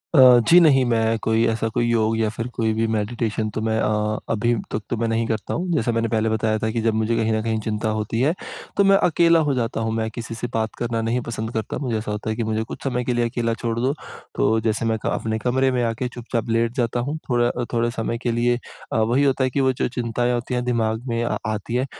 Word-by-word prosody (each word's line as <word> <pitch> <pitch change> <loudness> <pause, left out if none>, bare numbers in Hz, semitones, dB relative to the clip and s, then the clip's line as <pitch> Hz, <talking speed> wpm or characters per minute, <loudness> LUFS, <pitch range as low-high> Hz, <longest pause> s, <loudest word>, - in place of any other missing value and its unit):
अ, 130 -3 +8
जी, 175 - +9
नहीं, 145 -6 +5
मैं 115 0 +2
कोई 110 +1 +2
ऐसा 115 0 0
कोई 120 - +1
योग 110 -1 +2
या 110 -1 +2
फिर 115 +1 -3
कोई 110 -2 0
भी 110 +1 0
मेडिटेशन 110 0 -1
तो - - -1
मैं 110 0 0
अ, 105 0 0
अभी 115 +2 +1 0.2
तक 110 - -2
तो 120 - -1
मैं 115 +1 0
नहीं 115 0 0
करता 110 -2 -2
हूँ। 180 +2 -2
जैसा 120 -6 +1
मैंने 115 0 0
पहले 110 0 +1
बताया 110 0 +1
था 110 - -1
कि 115 0 -1
जब 115 -1 +1
मुझे 110 +1 0
कहीं 110 -1 +1
न 110 - 0
कहीं 110 -1 0
चिंता 110 +1 -2
होती 110 +1 -2
है, 145 +5 +3 0.4
तो 200 - +5
मैं 195 0 +6
अकेला 170 0 +4
हो - - +2
जाता 115 -2 -1
हूँ, 110 - -1
मैं 110 0 -1
किसी 115 0 -6
से 120 - -4
बात 110 -1 -1
करना 115 -1 -1
नहीं 115 +2 0
पसंद 110 -1 -4
करता। 110 -1 -3
मुझे 120 -5 -1
ऐसा 105 0 -4
होता 105 +1 -4
है 110 - -1
कि 115 - -2
मुझे 110 0 -1
कुछ - - -9
समय 125 -2 -1
के 125 - -1
लिए 120 0 +1
अकेला 115 -1 -1
छोड़ 115 +1 -3
दो, 130 +4 +1 0.4
तो 110 - +2
जैसे 110 +1 0
मैं 110 0 +1
का - - 0
अपने 110 0 -1
कमरे 130 +4 +1
में 125 -1 0
आके 115 +2 -1
चुपचाप 120 -1 -3
लेट 115 0 +1
जाता 120 -1 0
हूँ, 140 +6 -2
थोड़ा 120 -1 +3
अ, 120 - -3
थोड़े 120 0 +1
समय 115 0 -2
के 120 - +1
लिए। 120 +1 +2 0.4
अ, - - +1
वही 120 +5 +2
होता 135 -1 +2
है 130 - +2
कि 140 - 0
वो 130 0 +3
जो - - -1
चिंताएँ 120 +1 0
होती 120 +1 -3
हैं, 125 0 0
दिमाग 115 -1 0
में 115 -1 -1
आ - - -1 0.2
आती 110 +3 -4
हैं। 125 +1 +1
115 Hz, 265 wpm, -22 LUFS, 110-120 Hz, 0.4 s, जी